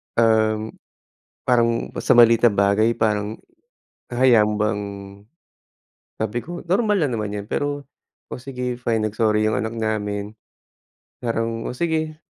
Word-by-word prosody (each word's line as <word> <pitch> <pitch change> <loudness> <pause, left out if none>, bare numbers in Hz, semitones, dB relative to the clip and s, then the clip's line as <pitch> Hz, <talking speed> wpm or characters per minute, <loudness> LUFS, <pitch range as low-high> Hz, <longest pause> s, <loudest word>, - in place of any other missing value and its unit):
Um, 110 -1 +2 0.8
parang 115 -2 +2
sa - - +4
maliit 115 -1 +6
na - - +6
bagay 100 +3 +2
parang 105 -1 0 0.8
hahayaan 120 -3 +5
mo 105 - -1
bang 105 -1 0 1.4
sabi 110 +2 -2
ko 175 +1 -7
normal 205 +3 +2
lang 150 -7 0
naman 105 -2 -3
yan, 100 -1 -5
pero, 145 +1 -2 0.4
o - - -6
sige 125 -1 -4
fine, 115 -2 -1
nag-sorry 105 0 +1
yung 110 - +1
anak 110 +2 -2
namin. 105 -1 -3 0.9
Parang 115 -1 -2
o - - -3
sige, 160 -1 -1
115 Hz, 130 wpm, -22 LUFS, 105-125 Hz, 1.4 s, maliit